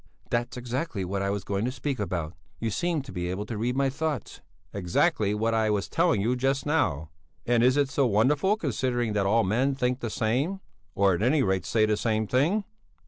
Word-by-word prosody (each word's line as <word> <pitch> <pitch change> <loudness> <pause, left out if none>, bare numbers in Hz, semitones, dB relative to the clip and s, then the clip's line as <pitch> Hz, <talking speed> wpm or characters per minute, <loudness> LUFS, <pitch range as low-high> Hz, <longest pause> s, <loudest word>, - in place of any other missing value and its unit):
"That's 120 +1 -1
exactly 125 - -3
what 95 +2 -2
I 100 - 0
was 100 -1 -2
going 100 +2 -2
to 125 - -1
speak 135 +1 -3
about. 85 -5 -3 0.3
You 115 -1 -2
seem 165 +4 -1
to 130 - -10
be 90 -1 -3
able 95 +3 -3
to 115 - -5
read 120 +4 -1
my 140 0 +2
thoughts." 150 -3 -4 0.3
"Exactly 100 - +1
what 115 +2 0
I 110 -1 +2
was 100 -4 0
telling 100 - +2
you 120 +5 +1
just 135 +2 0
now. 85 - 0 0.3
And 120 -1 +3
is 130 +3 +4
it 145 -1 +3
so 135 -1 +1
wonderful 145 - +2
considering 120 - -1
that 100 -2 +1
all 115 +3 +3
men 125 +8 +1
think 125 -1 0
the 120 - -3
same, 130 - 0 0.4
or 100 -1 +4
at 85 - -2
any 135 +5 +3
rate 95 -4 0
say 110 0 +3
the 105 -1 +1
same 110 0 0
thing? 150 - +1
120 Hz, 210 wpm, -27 LUFS, 105-135 Hz, 0.4 s, is